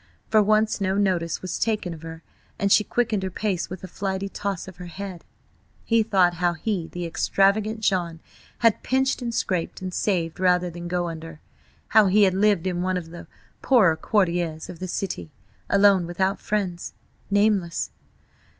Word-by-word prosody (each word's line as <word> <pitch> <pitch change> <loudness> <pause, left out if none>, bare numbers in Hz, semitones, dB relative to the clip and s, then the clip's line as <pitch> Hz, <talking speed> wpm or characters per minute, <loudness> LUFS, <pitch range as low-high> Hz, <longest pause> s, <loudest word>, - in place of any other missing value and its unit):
For 215 - +6
once 215 +1 +2
no 190 0 +1
notice 180 -5 0
was 185 - -3
taken 210 -6 -1
of 160 - -11
her, 165 0 -9 0.3
and 200 0 0
she 210 - +6
quickened 225 -3 0
her 190 - -2
pace 185 -1 -2
with 185 +1 -8
a - - -5
flighty 195 +1 -3
toss 195 -3 -4
of 190 -2 -11
her 180 0 -8
head.... 185 -1 -7 0.6
He 230 -1 +3
thought 190 -5 +3
how 175 0 +1
he, 175 0 -2
the 175 0 -4
extravagant 200 +5 +1
John, 175 -5 0 0.5
had 230 - +4
pinched 265 +1 0
and 240 -1 -2
scraped 185 -6 -2
and 185 -1 -5
saved 175 -6 -1
rather 180 -1 +2
than 175 +1 -7
go 175 0 -1
under; 165 -1 -8 0.5
how 215 -2 +6
he 205 +3 +5
had 190 -2 +4
lived 200 -2 +2
in 180 -2 -1
one 185 0 0
of 165 -2 -7
the 170 - -10 0.3
poorer 210 -12 +4
quartiers 170 -4 0
of 175 - -9
the 185 - -4
city, 170 - -4 0.4
alone, 200 -3 +4
without 190 +3 -1
friends–nameless. 200 0 -1
185 Hz, 170 wpm, -24 LUFS, 175-205 Hz, 0.6 s, For